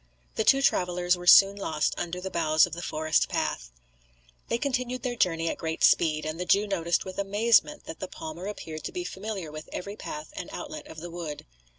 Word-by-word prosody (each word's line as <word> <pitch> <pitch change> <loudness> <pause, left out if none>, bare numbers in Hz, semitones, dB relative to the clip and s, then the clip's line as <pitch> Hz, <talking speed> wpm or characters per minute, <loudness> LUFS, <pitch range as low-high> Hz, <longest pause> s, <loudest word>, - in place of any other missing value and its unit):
The 220 - 0
two 275 +5 +4
travellers 180 -4 +2
were 175 0 -9
soon 195 +2 +8
lost 155 -6 -1
under 175 +1 -4
the 190 +1 -5
boughs 155 -2 +4
of 175 - -10
the 170 - -5
forest 155 -2 +1
path. - - -2 0.8
They 235 - 0
continued 255 -1 -2
their 245 -1 -2
journey 165 -6 +1
at - - -2
great 160 0 -3
speed; 155 -2 +4
and 155 +2 -4
the 180 - -2
Jew 200 +2 +4
noticed 175 -4 0
with 185 0 -6
amazement 225 +9 +2
that - - -8
the - - -4
palmer 315 - -7
appeared 160 -6 -6
to - - -3
be 360 - -4
familiar 195 - -5
with 155 0 -9
every 200 +3 -5
path 150 -6 -7
and 180 - -6
outlet 310 0 -7
of 160 - -10
the 175 0 -7
wood. 165 -4 -6
180 Hz, 210 wpm, -27 LUFS, 160-210 Hz, 0.8 s, soon